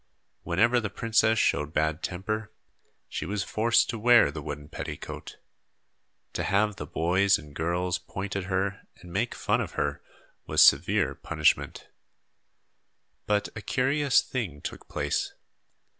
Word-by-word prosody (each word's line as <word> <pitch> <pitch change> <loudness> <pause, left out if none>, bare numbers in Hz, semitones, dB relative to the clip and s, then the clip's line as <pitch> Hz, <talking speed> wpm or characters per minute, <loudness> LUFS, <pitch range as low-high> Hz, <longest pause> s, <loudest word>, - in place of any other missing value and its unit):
Whenever 115 +8 +2
the 110 -3 -3
princess 110 +1 +2
showed 75 -6 +1
bad 80 +1 +1
temper, 110 +4 -3 0.6
she - - -4
was 100 +4 -2
forced 115 +4 +2
to 115 - -4
wear 120 -8 +6
the 75 +1 -6
wooden 75 0 -6
petticoat. - - -7 1.0
To - - -2
have 105 0 +1
the - - -6
boys 95 +4 +2
and 75 -2 -13
girls 90 +3 -1
point 95 +2 -6
at 100 -2 -2
her 95 +1 -2
and 90 -1 -13
make 115 +5 -1
fun - - 0
of - - -5
her 70 0 -2 0.5
was - - +5
severe - - +4
punishment. 75 -2 0 1.4
But 105 -1 +1
a 105 - -6
curious 135 +5 +2
thing 100 - -4
took - - -7
place. 75 0 -2
95 Hz, 140 wpm, -27 LUFS, 85-110 Hz, 1.4 s, wear